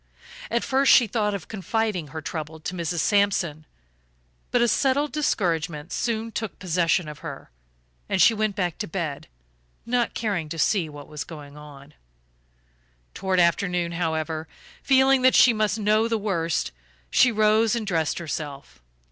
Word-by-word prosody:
At 235 +1 0
first 270 +1 +3
she 245 - +7
thought 210 -1 -1
of 195 - -7
confiding 210 -3 -2
her 160 +2 -7
trouble 160 -1 -5
to 160 - -5
Mrs. 170 -1 -2
Sampson, 185 -7 +1 0.8
but 245 - +2
a - - +3
settled 275 +5 +1
discouragement 170 - -1
soon 230 -1 -2
took 220 -1 -5
possession 175 -2 +1
of 150 -1 -8
her - - -9 0.6
and - - 0
she 230 - +6
went 215 -2 -1
back 180 -5 -2
to - - -3
bed, 160 -5 -4 0.6
not 240 0 0
caring 195 -9 -2
to 165 - -5
see 170 0 +1
what 145 -1 -11
was 150 -1 -6
going 145 -3 -11
on. 145 -1 -13 1.2
Toward 190 -1 0
afternoon, 175 0 +1
however, 160 -1 -2 0.3
feeling 265 -1 +4
that 255 0 +5
she 245 - +7
must 215 -1 0
know 215 +1 +2
the 230 -1 0
worst, 170 -6 -1 0.4
she 250 - +5
rose 215 +1 +3
and 230 -2 -3
dressed 165 -6 0
herself. 145 - -6
185 Hz, 155 wpm, -24 LUFS, 160-220 Hz, 1.2 s, she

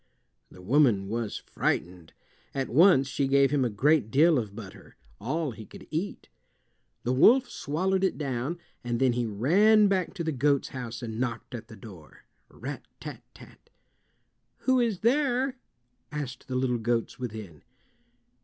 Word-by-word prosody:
The 90 - -15
woman 115 -4 +3
was 115 -1 -3
frightened. 85 -2 -3 0.4
At 135 -1 -2
once 150 -1 +5
she 135 0 -1
gave 140 0 +4
him 145 -3 +2
a 125 - +1
great 130 +3 +2
deal 155 +3 +4
of 105 -4 -6
butter—all 115 - -6
he 110 -1 -10
could - - -13
eat. 170 +6 -4 0.8
The 125 - 0
wolf 245 - +6
swallowed 185 +6 -1
it 190 - +1
down, 140 +2 -3 0.3
and 120 -1 -2
then 130 -2 +3
he 120 -1 -1
ran 200 - +4
back 190 -1 -1
to 175 - -3
the 160 - -1
goat's 140 0 +1
house 120 -2 -6
and 110 -1 -5
knocked 120 -2 -3
at 120 -2 -7
the 110 - -12
door—rat 95 -10 -11
tat - - -8 0.2
rat! - - -17 0.9
"Who 260 -1 +3
is 230 -6 0
there?" 260 +1 +1 0.5
asked 140 -4 -6
the 130 - -4
little 125 -2 0
goats 115 +1 -1
within. 110 - -7
130 Hz, 150 wpm, -27 LUFS, 115-165 Hz, 0.9 s, wolf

